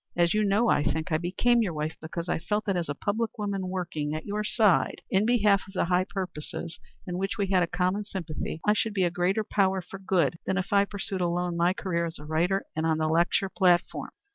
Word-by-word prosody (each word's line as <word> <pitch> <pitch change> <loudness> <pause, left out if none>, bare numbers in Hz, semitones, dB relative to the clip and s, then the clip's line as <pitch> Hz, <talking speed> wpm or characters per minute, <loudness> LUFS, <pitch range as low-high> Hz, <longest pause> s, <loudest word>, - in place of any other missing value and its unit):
As 170 -1 +3
you 215 0 +2
know, 210 +4 +3
I 145 - +3
think, 160 +3 -1
I 155 - +2
became 235 +8 +2
your 190 -6 -1
wife 155 +1 -3
because 165 +2 -5
I 175 - 0
felt 210 +6 -1
that 195 - 0
as 170 -4 -2
a 145 - -2
public 220 +7 -2
woman 200 -3 -2
working, 165 -5 -3
at 155 - -5
your 210 +1 -2
side 210 -3 +2
in 195 +3 +3
behalf 210 -5 +4
of 195 - -13
the - - +1
high 180 +1 +1
purposes 170 -3 -5 0.3
in 180 0 -4
which 195 +3 -2
we 200 - +1
had 190 -1 +2
a 175 - +2
common 180 +4 0
sympathy, 170 -5 -5
I 210 - +5
should 215 0 -1
be 190 - +2
a 175 - +2
greater 180 +5 +1
power 195 -2 +1
for 190 +1 -9
good 170 -5 +1
than 190 - +1
if 195 +1 -2
I 200 0 +5
pursued 195 -1 -4
alone 175 0 0
my 170 +2 +3
career 170 -4 -1
as 165 - -7
a 150 - -11
writer 170 +5 0
and 160 - -1
on 160 -1 +2
the 155 0 0
lecture 170 +4 +2
platform. 180 -2 +1
185 Hz, 240 wpm, -27 LUFS, 170-200 Hz, 0.3 s, I